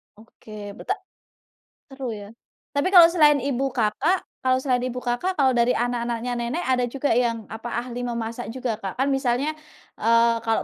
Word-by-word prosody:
Oke 215 Hz, -1 st, -11 dB
beta 395 Hz, -, -2 dB, 0.9 s
seru 265 Hz, -3 st, -5 dB
ya, 205 Hz, -1 st, -9 dB, 0.5 s
tapi 285 Hz, +6 st, +1 dB
kalau 345 Hz, -2 st, +10 dB
selain 300 Hz, -4 st, +5 dB
ibu 270 Hz, 0 st, -1 dB
Kakak 255 Hz, -, +1 dB, 0.2 s
kalau 255 Hz, 0 st, +2 dB
selain 255 Hz, -3 st, +2 dB
ibu 250 Hz, 0 st, -5 dB
Kakak, 250 Hz, +10 st, -1 dB
kalau 270 Hz, -4 st, +3 dB
dari 240 Hz, 0 st, +2 dB
anak-anaknya 240 Hz, 0 st, -1 dB
nenek, 245 Hz, +9 st, -2 dB
ada 250 Hz, -1 st, +1 dB
juga 275 Hz, +3 st, -1 dB
yang 230 Hz, -2 st, +1 dB
apa, 230 Hz, +2 st, -5 dB
ahli 245 Hz, 0 st, -5 dB
memasak 235 Hz, 0 st, -4 dB
juga, 240 Hz, -4 st, -3 dB
Kak? 195 Hz, -3 st, -5 dB
Kan 275 Hz, +2 st, +1 dB
misalnya 270 Hz, +2 st, +1 dB, 0.9 s
kalau, 225 Hz, 0 st, 0 dB
245 Hz, 160 wpm, -24 LUFS, 235-275 Hz, 0.9 s, kalau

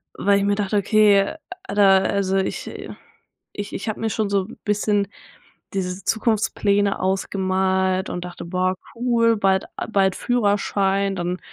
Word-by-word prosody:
Weil 200 Hz, 0 st, +2 dB
ich 200 Hz, -, 0 dB
mir 205 Hz, -, +2 dB
dachte: 205 Hz, 0 st, -1 dB
„Okay, 205 Hz, -1 st, +4 dB, 0.3 s
alter, 195 Hz, -, +4 dB
also 195 Hz, -1 st, 0 dB
ich, 190 Hz, -, -2 dB
äh -, -, -8 dB, 0.6 s
ich 205 Hz, -1 st, -6 dB
ich -, -, -4 dB
habe 215 Hz, -, -4 dB
mir 225 Hz, -, -1 dB
schon 215 Hz, 0 st, -1 dB
so 200 Hz, -1 st, +1 dB
'n -, -, -12 dB
bisschen 205 Hz, -1 st, +1 dB, 0.7 s
diese 185 Hz, -1 st, -3 dB
Zukunftspläne 205 Hz, -2 st, +1 dB
ausgemalt 190 Hz, 0 st, 0 dB
und 180 Hz, -, -4 dB
dachte: 175 Hz, -1 st, -8 dB
„Boah 185 Hz, +1 st, 0 dB, 0.2 s
cool, 230 Hz, -1 st, +2 dB
bald 190 Hz, -1 st, +2 dB
a -, -, -4 dB
bald 195 Hz, -3 st, +2 dB
Führerschein, 200 Hz, -4 st, +1 dB
dann 175 Hz, +1 st, -2 dB
200 Hz, 150 wpm, -22 LUFS, 190-210 Hz, 0.7 s, Okay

